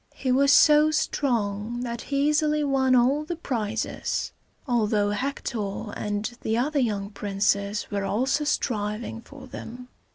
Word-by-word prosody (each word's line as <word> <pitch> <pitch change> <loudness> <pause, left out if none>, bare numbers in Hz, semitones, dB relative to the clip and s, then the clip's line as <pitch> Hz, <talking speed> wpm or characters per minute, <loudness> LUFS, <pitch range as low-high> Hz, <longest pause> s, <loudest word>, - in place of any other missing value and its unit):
He 260 - -1
was 275 +2 +4
so 300 +1 +6
strong 240 -7 -1
that 235 -1 -4
he 280 0 +2
easily 300 0 +2
won 265 -2 +2
all 260 +5 +3
the 345 +3 -4
prizes, 225 -9 -3 0.4
although 215 -4 +1
Hector 215 -3 -3
and 205 0 -3 0.2
the 220 +1 0
other 285 +4 +1
young 205 -5 -1
princes 200 0 0
were 200 -1 -1
also 260 +9 0
striving 225 -5 -2
for 270 +2 -13
them. 250 -1 -9
240 Hz, 135 wpm, -25 LUFS, 210-280 Hz, 0.4 s, so